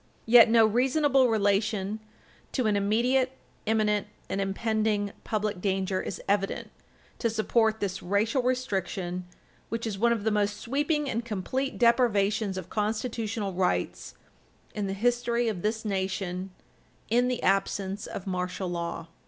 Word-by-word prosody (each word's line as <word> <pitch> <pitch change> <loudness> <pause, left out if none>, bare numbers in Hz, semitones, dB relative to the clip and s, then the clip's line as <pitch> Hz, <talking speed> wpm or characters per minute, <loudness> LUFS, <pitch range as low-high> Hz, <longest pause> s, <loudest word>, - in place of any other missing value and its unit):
Yet 230 0 +8
no 225 -1 +6
reasonable 265 +3 +3
relation 205 -1 +1 0.5
to 255 - 0
an 210 -1 +2
"immediate, 245 +6 +2 0.3
imminent, 210 -2 +2 0.2
and 195 - -1
impending" 210 +1 0
public 210 -3 -2
danger 190 -1 0
is - - -5
evident 195 0 0 0.5
to 230 - +1
support 220 0 +1
this 195 -2 -3
racial 210 +8 +1
restriction, 190 -8 -2 0.4
which 230 0 -3
is 205 -4 -3
one 235 +2 +4
of 225 -3 0
the 220 - +1
most 205 0 +1
sweeping 295 +5 0
and 235 -2 -1
complete 235 +5 -3
deprivations 215 -4 +2
of 185 -2 -5
constitutional 215 -1 -2
rights 180 0 -1 0.6
in 205 -2 -2
the 195 - -2
history 240 +2 +1
of 205 -6 -2
this 220 +2 -1
nation 190 -2 -2 0.6
in 245 +2 +4
the 250 -1 -2
absence 195 +1 0
of 190 - -6
martial 180 0 -3
law. 170 -1 -4
215 Hz, 135 wpm, -28 LUFS, 195-235 Hz, 0.6 s, Yet